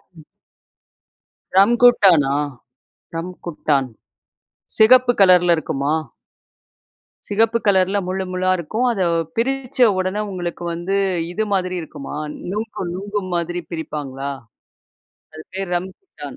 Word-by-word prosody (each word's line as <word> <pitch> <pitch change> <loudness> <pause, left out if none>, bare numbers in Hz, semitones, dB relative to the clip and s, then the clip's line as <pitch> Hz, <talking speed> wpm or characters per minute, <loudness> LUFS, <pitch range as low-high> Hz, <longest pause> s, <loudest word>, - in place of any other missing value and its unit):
ம். 155 - -15 1.3
ரம்குட்டானா? 195 - +5 0.8
ரம்குட்டான். 165 -5 -2 0.9
சிகப்பு 245 +2 +6
கலர்ல 180 -2 +6
இருக்குமா? 140 -1 -1 1.3
சிகப்பு 225 +3 +2
கலர்ல 190 0 +3
முள்ளு 190 +1 -2
முள்ளா 185 0 0
இருக்கும். 215 +9 -2
அதை 195 -6 0 0.3
பிரிச்ச 265 +2 -2 0.2
உடனே 185 +3 -1
உங்களுக்கு 175 -2 -5
வந்து 175 +4 -2 0.4
இது 215 +4 -1
மாதிரி 185 -1 0
இருக்குமா? 145 -2 -8 0.3
நுங்கு, 215 +1 -4
நுங்கு 205 +2 -3
மாதிரி 175 +1 -2
பிரிப்பாங்களா? 140 -4 -5 1.0
அது 155 - -9
பேரு 195 -1 -3
ரம்குட்டான். 190 - -8
185 Hz, 95 wpm, -20 LUFS, 170-210 Hz, 1.3 s, சிகப்பு